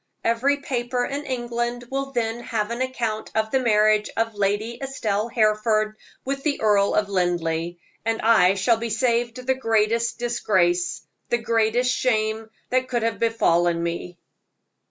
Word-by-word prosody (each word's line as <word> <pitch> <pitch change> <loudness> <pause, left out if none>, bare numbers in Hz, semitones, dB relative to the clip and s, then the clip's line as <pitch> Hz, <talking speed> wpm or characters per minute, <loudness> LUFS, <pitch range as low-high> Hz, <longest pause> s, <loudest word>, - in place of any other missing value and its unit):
Every 255 +5 +2
paper 245 -2 -2
in 285 +3 -5
England 240 -1 -2
will 275 0 -2
then 235 -2 -1
have 225 -2 -3
an 235 +2 -3
account 235 -4 -2
of 220 0 0
the 265 - +3
marriage 215 -3 +3
of 225 0 0
Lady 205 +3 -1
Estelle 225 -6 -2
Hereford 215 -1 +1 0.3
with 275 +1 -2
the 290 0 -1
Earl 205 -2 +3
of 210 - +2
Linleigh, 175 -3 -1 0.3
and 225 +1 -1
I 215 -4 +5
shall 220 +4 +2
be 230 +1 -4
saved 235 +2 0
the 265 - +3
greatest 225 -2 +1
disgrace 185 -7 0 0.3
the 240 - +2
greatest 230 +2 +1
shame 220 -2 0 0.2
that 255 0 +1
could 240 -3 -1
have 225 -3 -1
befallen 175 -7 +2
me. 170 +1 -4
225 Hz, 150 wpm, -23 LUFS, 210-240 Hz, 0.3 s, I